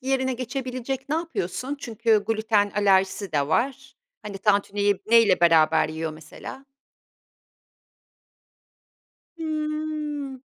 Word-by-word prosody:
yerine 260 0 0
geçebilecek 255 +1 -4
ne 305 - 0
yapıyorsun? 290 - -3
Çünkü 225 -2 +1
glüten 215 -2 +1
alerjisi 195 -2 +2
de 145 -2 0
var. 255 - -1 0.3
Hani, 200 -2 -7
tantuniyi 205 -1 +1
neyle 225 -5 +5
beraber 160 -2 +4
yiyor 160 0 -4
mesela? 160 - -10 2.7
Hıı. 305 -3 -3
225 Hz, 90 wpm, -24 LUFS, 195-270 Hz, 2.7 s, neyle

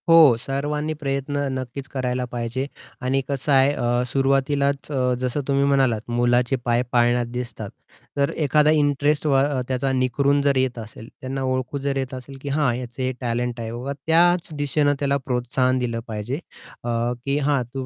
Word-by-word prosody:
हो, 160 -7 +8
सर्वांनी 150 +4 -2
प्रयत्न 140 0 -2 0.2
नक्कीच 130 +1 -6
करायला 125 -1 -2
पाहिजे 120 +2 -3 0.4
आणि 135 +1 +2
कसं 140 +1 -2
आहे, 135 +1 +5
अ, 120 -2 0
सुरुवातीलाच 140 +2 +1
अ, 130 -3 +1
जसं 130 +3 -1
तुम्ही 140 0 +2
म्हणालात, 135 -6 +2
"मुलाचे 120 +2 +2
पाय 120 0 +2
पाळण्यात 120 0 +3
दिसतात." 120 -4 -5 0.5
तर 140 0 +2 0.2
एखादा 150 +2 +4
इंटरेस्ट 145 0 +2
व 145 - +3
अ, 140 -2 0
त्याचा 130 +1 0
निखरून 140 +2 +2
जर 140 -1 +2
येत 130 -2 0
असेल, 110 +1 -10
त्यांना 135 +1 -4
ओळखून 130 +1 -2
जर 140 0 -1
येत 130 -1 -3
असेल, 130 +1 -8
की 145 - -5
हां, 140 -3 +2
याचं 125 +1 -7
हे 130 - 0
टॅलेंट 120 0 -2
आहे. 115 -1 -4
ओ, 120 +1 -6
हां, 140 - -2
त्याच 175 +2 +4
दिशेनं 145 0 +2
त्याला 140 -1 +1
प्रोत्साहन 125 +1 +1
दिलं 115 -2 -2
पाहिजे, 110 +5 -4 0.4
अ, 120 - -3 0.4
की 140 +1 +1
हां, 145 -2 +2
"तू 135 -1 -4
135 Hz, 175 wpm, -23 LUFS, 125-140 Hz, 0.5 s, हो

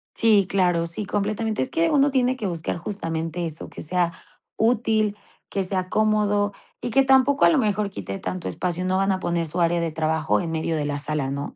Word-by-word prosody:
Sí, 215 -4 +4
claro, 180 -4 +1
sí, 170 +5 -4
completamente. 215 +2 -1
Es 260 - -1
que 330 0 +1
uno 285 -2 +3
tiene 255 -1 +2
que 225 - -5
buscar 170 -2 -3
justamente 165 -2 -3
eso, 160 -1 -6
que - - -9
sea 175 +1 0 0.5
útil, 220 -2 +2 0.3
que 195 - -1
sea 185 -1 -2
cómodo 210 -1 +2 0.3
y - - -3
que 270 +4 +4
tampoco 270 +1 +4
a - - +7
lo 330 - +3
mejor 210 -4 +1
quite 195 0 -6
tanto 185 -2 -4
espacio. 180 -1 -2
No 185 0 +1
van 195 +1 +2
a 190 - 0
poner 170 -2 -1
su 170 +3 -2
área 170 0 +2
de 165 -1 -1
trabajo 160 0 0
en 170 -2 -4
medio 160 0 -1
de 150 -2 -1
la 145 0 -2
sala, 145 -2 -2
¿no? 140 +1 -4
190 Hz, 215 wpm, -24 LUFS, 165-215 Hz, 0.5 s, a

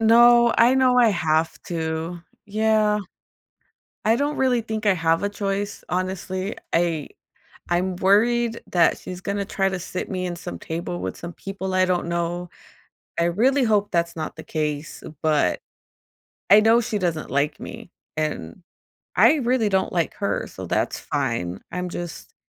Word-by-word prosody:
No, 235 +1 +6
I 240 +3 +6
know 255 -1 +4
I 240 -2 +6
have 160 -3 0
to. 165 0 -3 0.3
Yeah. 215 0 +2 1.1
I 220 +1 +4
don't 290 +4 -1
really 255 -3 +2
think 220 -1 -4
I 205 - +5
have 165 0 +1
a 205 - +1
choice, 200 0 -3
honestly. 185 +2 -2 0.2
I 165 -3 +1 0.6
I'm 180 +1 0
worried 230 +5 +3
that 175 -2 +4
she's 180 0 -8
gonna 200 0 -2
try 195 -1 0
to 190 -1 -3
sit 180 +1 -5
me 185 -2 -2
in 175 -1 -3
some 85 - -7
table 160 - -4
with 95 0 -4
some 170 0 -7
people 190 0 -5
I 185 0 +4
don't 180 -2 0
know. 170 +1 -2 0.7
I 170 - +3
really 250 +11 +3
hope 210 -3 +2
that's 170 0 0
not 155 -1 -5
the - - -9
case, 150 -1 -3 0.2
but 155 -2 +2 0.9
I 205 +2 +8
know 225 +2 +5
she 215 -1 -2
doesn't 170 -5 -2
like 140 +2 0
me, 230 -6 -9 0.2
and 155 - -3 0.5
I 315 - +6
really 250 -5 +1
don't 190 -1 0
like 170 -2 0
her, 200 - -2
so - - -8
that's - - 0
fine. 115 - -2
I'm 180 0 -3
just 175 -1 -7
185 Hz, 160 wpm, -23 LUFS, 170-220 Hz, 1.1 s, I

